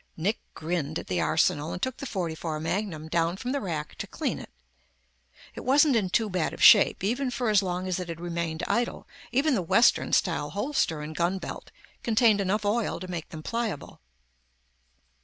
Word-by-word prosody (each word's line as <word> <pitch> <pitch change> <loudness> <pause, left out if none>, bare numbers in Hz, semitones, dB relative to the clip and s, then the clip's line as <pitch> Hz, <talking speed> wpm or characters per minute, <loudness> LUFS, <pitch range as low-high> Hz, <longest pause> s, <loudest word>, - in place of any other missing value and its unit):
Nick 195 +7 0 0.2
grinned 160 -2 -2
at - - -6
the 90 -2 -1
arsenal 150 +2 +1
and - - -4
took 260 +5 -2
the 275 - -6
.44 165 -6 -3
magnum 160 -1 -3
down 170 +2 0
from 250 +4 -4
the 280 0 -1
rack 155 -5 -4
to - - -4
clean - - -3
it. - - -10 1.0
It - - -8
wasn't 280 +1 +4
in 205 -5 +1
too 225 +4 +2
bad 180 -5 -1
of - - -3
shape, - - +7
even 250 +6 0
for 245 -2 -1
as 205 -2 +5
long 185 -1 -3
as 185 0 -1
it 180 -1 -5
had 165 -1 -5
remained 170 -2 -3
idle; 235 0 -1 0.2
even 275 +4 +2
the 215 - +1
western 230 +8 +3
style 155 -5 +1
holster 200 - -1
and 155 +1 -7
gunbelt 180 +3 -2 0.3
contained 220 -2 +3
enough 205 +2 0
oil 210 -1 0
to 185 - -7
make 175 -3 -5
them 155 -1 -8
pliable. 225 - -4
185 Hz, 185 wpm, -27 LUFS, 165-230 Hz, 1.0 s, shape